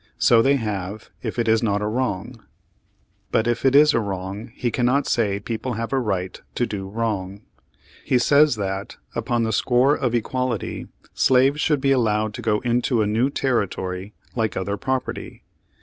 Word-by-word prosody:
So 115 -1 +5
they 135 +4 +4
have, 105 -4 -4
if - - -4
it 115 -1 0
is 110 0 +3
not 105 -3 +1
a 105 - -2
wrong. 115 0 -3 0.9
But 110 - +2
if 120 0 -1
it 135 0 +3
is 150 +1 +7
a - - +3
wrong, 100 +1 -5
he 120 -2 -1
cannot 130 +4 +1
say 100 -4 +1
people 115 +4 -4
have 115 +3 -4
a 135 - +3
right 95 -6 -3
to 120 - +1
do 95 -4 -5
wrong. 100 -2 -3 0.6
He 125 - +2
says 145 +1 +4
that, 95 -1 -4 0.2
upon 120 0 -1
the 110 0 -1
score 125 +6 +3
of 125 -5 -1
equality, 125 0 -2 0.3
slaves 135 +3 +3
should 150 -4 +1
be 135 0 +2
allowed 110 -4 +1
to 115 - -6
go 105 -2 +1
into 120 -1 +1
a - - 0
new 110 +6 +1
territory 100 -7 -2 0.2
like 110 -3 -1
other 100 +2 -2
property. 130 +4 -4
115 Hz, 175 wpm, -23 LUFS, 105-125 Hz, 0.9 s, is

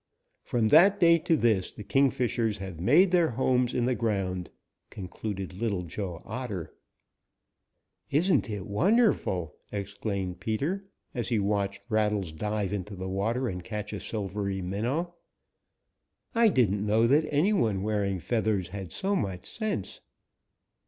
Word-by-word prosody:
From 115 -3 0
that 190 - +6
day 170 -1 +6
to 160 0 +2
this 110 -8 +2
the 105 - -9
Kingfishers 120 -3 +1
have 95 -4 -7
made 155 - +5
their 175 -3 +4
homes 125 0 +1
in 120 - 0
the 130 - +2
ground," 95 -6 -1 0.4
concluded 95 0 -6
Little 100 -2 -2
Joe 85 0 -5
Otter. 105 -10 -5 1.4
"Isn't 170 -1 +2
it 100 -3 -4
wonderful?" 140 - +2 0.2
exclaimed 100 -2 -4
Peter, 140 - -2 0.3
as 120 -2 -2
he 120 - +2
watched 100 -1 -1
Rattles 105 -5 0
dive 105 +3 -2
into 100 0 -4
the 95 0 -5
water 115 +7 -1
and 90 -4 -4
catch 105 +1 -5
a 105 - -4
silvery 100 -2 -3
minnow. 120 - -2 1.2
"I 230 0 +5
didn't 105 - +2
know 110 +2 +3
that 150 +6 +3
any 160 +9 +3
one 110 - +1
wearing 100 -2 0
feathers 100 0 0
had 95 -3 -7
so 195 - 0
much 95 - -3
sense." 215 - -3
105 Hz, 140 wpm, -28 LUFS, 95-130 Hz, 1.4 s, that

